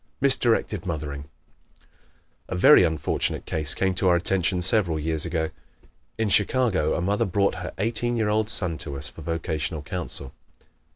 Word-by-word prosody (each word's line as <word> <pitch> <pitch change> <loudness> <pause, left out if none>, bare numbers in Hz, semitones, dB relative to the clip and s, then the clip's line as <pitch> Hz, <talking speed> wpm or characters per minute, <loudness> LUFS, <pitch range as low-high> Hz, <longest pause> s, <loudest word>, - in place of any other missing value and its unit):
Misdirected 115 -8 +1
Mothering 75 -4 -4 0.5
¶ - - -32 0.6
A - - -4
very 90 - +7
unfortunate 80 -3 -1
case 75 -2 0
came 95 0 0
to 95 +1 0
our 90 - +5
attention 90 0 +1
several 90 -5 +3
years 80 +1 -1
ago. 80 -1 -2 0.7
In 110 -1 0
Chicago 100 -5 +2
a - - -2
mother 105 +4 0
brought 100 +2 +1
her 90 - -5
eighteen 115 +3 -1
year 110 -2 0
old 105 0 0
son 90 -7 -1
to 70 -3 -6
us 70 - -6
for - - -13
vocational 80 -1 -3
counsel. 80 -5 -5
90 Hz, 160 wpm, -24 LUFS, 80-105 Hz, 0.7 s, very